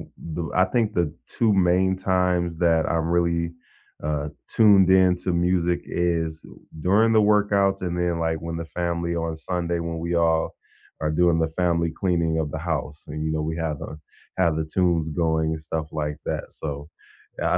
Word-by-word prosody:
m - - -10 0.3
b 85 - -2
I 90 - +5
think 115 -4 +2
the 85 -3 +1 0.3
2 115 -3 +3 0.2
main 95 +1 +3 0.2
times 90 -1 +2
that 80 -1 +4
I 85 - 0 0.2
really, 85 -1 +1 0.6
uh, 75 -1 -1 0.3
tuned 100 -4 +6
in 95 -1 +5
to 90 - 0 0.2
music 90 -1 +1
is 85 -2 0 0.5
during 110 +4 +4
the 110 - +5
workouts 100 -2 +2
and 90 -1 -2
then, 90 0 +1
like, 80 -1 -1
when 85 0 -3
the - - -4
family 85 0 -1
on 80 - -2 0.2
Sunday 85 -1 -1
when 80 -1 -3
we 85 - -2
all 80 0 +2 0.6
are 75 - +1
doing 85 -2 +4
the 80 - +1
family 85 -2 +1
cleaning 85 -4 +1
of 75 - -3
the 80 - -2
house 75 0 -2
and, 75 - -6
you 80 - -1
know, 75 - -1
we 80 - -4
have, 75 -2 -3
uh - - -8 0.5
have 80 -3 +2
the - - -1
tunes 85 -4 +2 0.2
going 80 -1 +1
and 80 - -7
stuff 80 -1 -2
like 75 0 -3
that, - - -2
so, 75 -2 -3 0.7
yeah, - - 0
85 Hz, 190 wpm, -24 LUFS, 80-90 Hz, 0.7 s, tuned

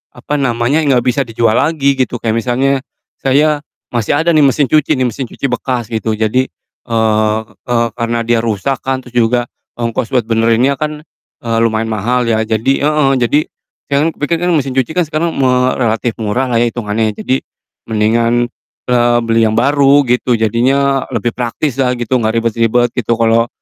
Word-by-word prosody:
apa 150 - -4
namanya, 120 +2 +1
gak 130 -5 +2
bisa 125 +2 +1
dijual 115 -1 +1
lagi 140 -3 +1
gitu 130 -1 0
kayak 110 -1 -1
misalnya 130 +3 0 0.4
saya 145 +3 +2 0.4
masih 115 -3 0
ada 160 +3 +2
nih 155 - +5
mesin 140 +1 +3
cuci 155 0 +3
nih, 130 - +2
mesin 125 +3 -4
cuci 140 - -4
bekas 125 -1 -2
gitu. 110 0 -1
Jadi, 110 +4 0 0.4
eee 110 -1 +1 0.3
eee, 120 -1 +1
karena 115 -1 -1
dia 115 0 +1
rusak 115 +4 -1
kan 130 0 -2
terus 125 -1 -15
juga 120 +1 +2 0.3
ongkos 115 0 -2
buat 125 - +3
benerinnya 115 +4 +2
kan, 150 0 -4 0.4
eee, 115 -1 -1
lumayan 115 0 0
mahal 120 +4 0
ya 110 -1 +1
jadi 110 +4 +1 0.2
heeh, 150 -3 +2
jadi 125 +4 +2 0.5
sekarang 150 +4 +1
pikir 165 +3 -1
kan 175 +1 0
mesin 140 -3 0
cuci 130 +2 0
kan 180 - +3
sekarang 160 +2 -2
me 125 -1 +2
relatif 115 -1 -1
murahlah 120 +4 -1
ya 120 +1 +3
hitungannya, 110 -1 -1
jadi 130 +1 0 0.5
mendingan, 115 +2 +2 0.4
eee, 120 -1 +3
beli 115 0 +2
yang - - 0
baru 140 +1 +4
gitu 125 +1 +1
jadinya 130 +5 +1
lebih 120 -1 -1
praktislah 125 +1 -1
gitu 120 +1 -1
gak 110 0 -1
ribet-ribet 115 +1 +1
gitu. 120 -1 0
Kalo 115 0 +2
120 Hz, 170 wpm, -14 LUFS, 115-135 Hz, 0.5 s, nih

